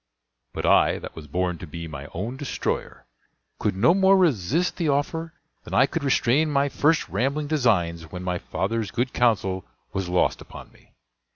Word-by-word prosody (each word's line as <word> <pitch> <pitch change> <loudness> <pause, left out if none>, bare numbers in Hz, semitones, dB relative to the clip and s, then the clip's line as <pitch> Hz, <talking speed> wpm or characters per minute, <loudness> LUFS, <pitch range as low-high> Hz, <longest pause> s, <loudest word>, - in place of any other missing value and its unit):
But - - -3
I, - - +4
that - - -9
was 80 -2 -9
born 90 +2 -1
to 90 - -8
be 85 +2 -7
my 70 -2 -8
own 110 +9 -4
destroyer, 140 - -4 0.5
could - - 0
no 115 - +4
more 195 0 +5
resist 165 - +1
the 165 -4 0
offer 160 +4 -1 0.3
than - - -6
I 130 - +6
could 160 +2 -4
restrain 140 +2 +2
my 140 -1 +2
first 150 +3 +2
rambling 135 - -1
designs 90 - 0
when 90 0 -6
my 90 -1 -2
father's 110 +1 -2
good 125 +5 -2
counsel 95 -6 +1 0.3
was 95 -2 -2
lost 90 0 +1
upon - - -11
me. - - -24
120 Hz, 175 wpm, -24 LUFS, 90-150 Hz, 0.5 s, I